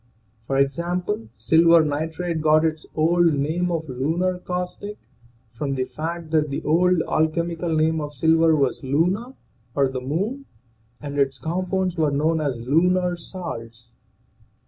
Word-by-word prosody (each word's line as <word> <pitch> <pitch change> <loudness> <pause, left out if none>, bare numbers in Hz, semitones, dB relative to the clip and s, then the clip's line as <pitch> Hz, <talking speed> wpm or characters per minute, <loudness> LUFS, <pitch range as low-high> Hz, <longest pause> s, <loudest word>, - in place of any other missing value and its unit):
For 135 - 0
example, 170 - -1
silver 165 +8 +4
nitrate 160 +3 -2
got 155 +1 +4
its 155 -1 -2
old 165 0 +3
name 160 +6 0
of 160 -2 -2
lunar 165 +8 -1
caustic 180 +3 -5 0.6
from 135 +3 -3
the 130 - 0
fact 165 +4 -5
that 155 -2 +2
the 140 - -4
old 175 +2 +3
alchemical 165 +2 -1
name 160 0 +2
of 150 0 -6
.silver 160 +3 +4
was 135 -3 0
luna 180 - 0 0.4
or 140 -2 +3
the 130 -1 -4
moon, 200 - -2 0.6
and 145 -1 -4
its 135 -1 +1
compounds 185 +2 -2
were 155 -2 +2
known 155 +3 +1
as 140 -5 -1
lunar 175 +8 +2
salts. 120 - -8
160 Hz, 140 wpm, -23 LUFS, 145-175 Hz, 0.6 s, silver